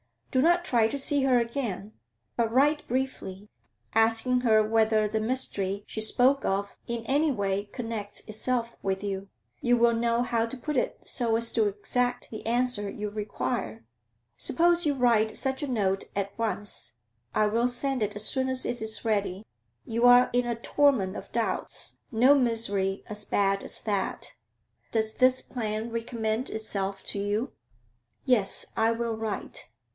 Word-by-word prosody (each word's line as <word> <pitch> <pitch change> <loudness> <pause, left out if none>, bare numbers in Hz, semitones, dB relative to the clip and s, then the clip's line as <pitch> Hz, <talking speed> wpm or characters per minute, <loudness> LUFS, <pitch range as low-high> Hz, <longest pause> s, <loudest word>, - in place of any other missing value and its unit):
Do 260 - +3
not 345 +3 +3
try 230 -7 +3
to 255 - -3
see 280 0 +1
her 255 -2 +4
again, 230 -4 -3 0.5
but 230 -1 +1
write 295 +5 +2
briefly, 230 -6 -3 0.4
asking 225 +3 +3
her 220 -3 +4
whether 220 -1 +2
the 220 +1 -1
mystery 205 -4 -2
she - - -6
spoke 255 +5 +4
of 200 +1 -2
in 235 -1 -4
any 290 +5 +2
way 200 -4 -1
connects 220 -2 -6
itself 235 +2 -2
with 190 0 -2
you. 195 -1 -4 0.3
You 245 0 +2
will 235 0 +4
know 235 +1 +1
how 230 -2 +1
to 265 - -7
put 295 +3 -3
it - - -2
so 230 -2 +1
as 230 0 +1
to 220 -2 +2
exact 245 +5 -2
the 220 - -7
answer 240 -3 +3
you 210 +1 -5
require. 130 - -4 0.5
Suppose 345 +3 +4
you 290 -2 +1
write 230 -4 +2
such 265 0 -1
a 290 - -2
note 195 -6 0
at 200 0 -3
once; 210 - -3 0.4
I 215 - +3
will 230 +3 +2
send 255 +1 -2
it 210 -1 -1
as 210 +1 +1
soon 260 -1 +3
as 260 0 -2
it 240 - -3
is 220 +1 0
ready. 205 -2 -1 0.4
You 230 +2 +2
are 245 0 +7
in 245 0 +1
the 235 - -1
torment 230 -5 +1
of - - -10
doubts; 230 -1 -1
no 250 +3 +5
misery 215 -7 +1
as 210 -1 -7
bad 195 0 +1
as - - -4
that. 200 -3 -3 0.6
Does 220 -1 0
this 255 0 +3
plan 220 -1 -4
recommend 230 0 -2
itself 195 -3 -3
to 200 - -1
you?' 205 +6 -1 0.7
'Yes; 230 -7 +2
I 225 +1 +3
will 230 0 -2
write.' 220 -2 -5
225 Hz, 165 wpm, -27 LUFS, 210-250 Hz, 0.7 s, are